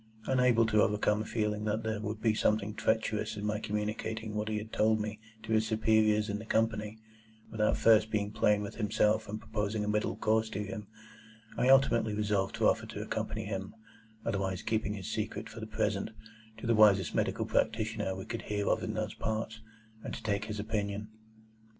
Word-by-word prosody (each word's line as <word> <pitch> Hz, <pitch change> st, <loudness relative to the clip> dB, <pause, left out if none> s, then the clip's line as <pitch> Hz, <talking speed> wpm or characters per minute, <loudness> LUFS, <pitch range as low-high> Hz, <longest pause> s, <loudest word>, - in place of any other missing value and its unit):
Unable 125 Hz, -3 st, +4 dB
to 110 Hz, -1 st, +3 dB
overcome 105 Hz, +1 st, +2 dB
a -, -, -4 dB
feeling 105 Hz, -2 st, -1 dB
that 110 Hz, +1 st, -1 dB
there 110 Hz, -1 st, -2 dB
would 105 Hz, 0 st, -4 dB
be 110 Hz, -2 st, +4 dB
something 105 Hz, -1 st, +1 dB
treacherous 110 Hz, 0 st, 0 dB
in 105 Hz, -, -4 dB
my 105 Hz, 0 st, 0 dB
communicating 110 Hz, +1 st, -3 dB
what 105 Hz, 0 st, -2 dB
he 110 Hz, -, -1 dB
had 110 Hz, +1 st, -7 dB
told 110 Hz, 0 st, +3 dB
me 105 Hz, 0 st, -4 dB, 0.2 s
to 110 Hz, -, -6 dB
his 110 Hz, 0 st, +3 dB
superiors 110 Hz, -1 st, +3 dB
in 105 Hz, -1 st, -2 dB
the 110 Hz, -, -8 dB
Company, 110 Hz, -1 st, 0 dB, 0.5 s
without 110 Hz, -1 st, +1 dB
first 110 Hz, -1 st, +5 dB
being 105 Hz, -1 st, -1 dB
plain 105 Hz, -1 st, +2 dB
with 100 Hz, -, -7 dB
himself 110 Hz, 0 st, +1 dB
and 110 Hz, +1 st, -4 dB
proposing 105 Hz, 0 st, -2 dB
a -, -, -4 dB
middle 105 Hz, 0 st, 0 dB
course 110 Hz, 0 st, +1 dB
to 105 Hz, -1 st, -3 dB
him, 105 Hz, 0 st, -6 dB, 0.7 s
I 125 Hz, -, +2 dB
ultimately 115 Hz, -5 st, +4 dB
resolved 105 Hz, -2 st, 0 dB
to -, -, +3 dB
offer -, -, +1 dB
to -, -, -6 dB
accompany -, -, -3 dB
him 100 Hz, -1 st, -5 dB, 0.5 s
(otherwise 95 Hz, -4 st, -1 dB
keeping 110 Hz, -2 st, -1 dB
his 95 Hz, -1 st, -6 dB
secret 110 Hz, 0 st, -3 dB
for 115 Hz, 0 st, -9 dB
the 110 Hz, -, -6 dB
present) 110 Hz, -2 st, -1 dB, 0.5 s
to 110 Hz, -, -8 dB
the 115 Hz, -, +3 dB
wisest 100 Hz, -5 st, +5 dB
medical -, -, 0 dB
practitioner 110 Hz, -3 st, 0 dB
we 95 Hz, -, -6 dB
could 115 Hz, -, -4 dB
hear 105 Hz, -1 st, -2 dB
of -, -, +2 dB
in -, -, -3 dB
those -, -, -2 dB
parts, 110 Hz, 0 st, -3 dB, 0.4 s
and -, -, -5 dB
to -, -, -9 dB
take 100 Hz, -2 st, 0 dB
his 105 Hz, -1 st, -5 dB
opinion. 105 Hz, -1 st, -2 dB
110 Hz, 195 wpm, -31 LUFS, 105-110 Hz, 0.7 s, first